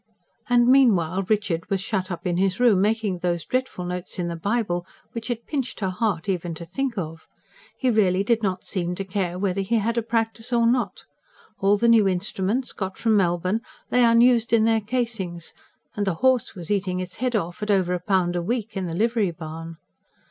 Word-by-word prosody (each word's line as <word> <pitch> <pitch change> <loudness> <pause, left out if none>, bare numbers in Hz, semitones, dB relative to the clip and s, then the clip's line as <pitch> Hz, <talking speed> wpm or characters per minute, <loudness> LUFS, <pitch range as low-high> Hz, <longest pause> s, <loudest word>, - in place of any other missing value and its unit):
And 240 -1 +5
meanwhile 195 -10 +4
Richard 205 -5 0
was 195 -2 +1
shut 190 -1 -2
up 175 +1 -6
in 175 -1 0
his 190 +1 +1
room, 230 -6 +5
making 210 -3 0
those 175 -1 -1
dreadful 255 -8 -2
notes 180 +1 -5
in 175 -1 -2
the 170 - -3
Bible 200 -1 -1 0.3
which 230 0 -6
it 235 -1 -3
pinched 270 -5 -3
her 190 -3 -1
heart 185 -2 -1
even 175 -3 -2
to 170 - -8
think 240 +7 -3
of. 165 -3 -5 0.5
He 255 -2 +1
really 195 -4 +3
did 230 +1 +1
not 190 -3 -1
seem 180 -2 -3
to 195 - -4
care 180 -2 -2
whether 195 0 0
he 195 +5 0
had 230 +2 0
a - - -1
practice 225 +1 -2
or 235 -1 +3
not. 245 +1 0 0.6
All 200 +1 +3
the 235 - +2
new 225 -3 +6
instruments, 195 +6 -1
got 190 -2 -5
from 225 -2 +2
Melbourne, 185 +2 +1 0.3
lay 250 - +4
unused 235 0 +4
in 225 -1 +5
their 225 0 +3
casings; 210 -7 -3 0.4
and 205 -1 -1
the 190 - +1
horse 260 +4 +2
was 175 0 -6
eating 185 -3 0
its 185 0 -5
head 250 0 -1
off, 175 -3 -2
at 210 - -3
over 185 -3 +2
a 180 - -1
pound 180 -2 +1
a 175 - 0
week, 220 +3 -3
in 190 -2 -2
the 165 - -4
livery 225 0 +1
barn. 165 0 -8
200 Hz, 205 wpm, -24 LUFS, 180-230 Hz, 0.6 s, new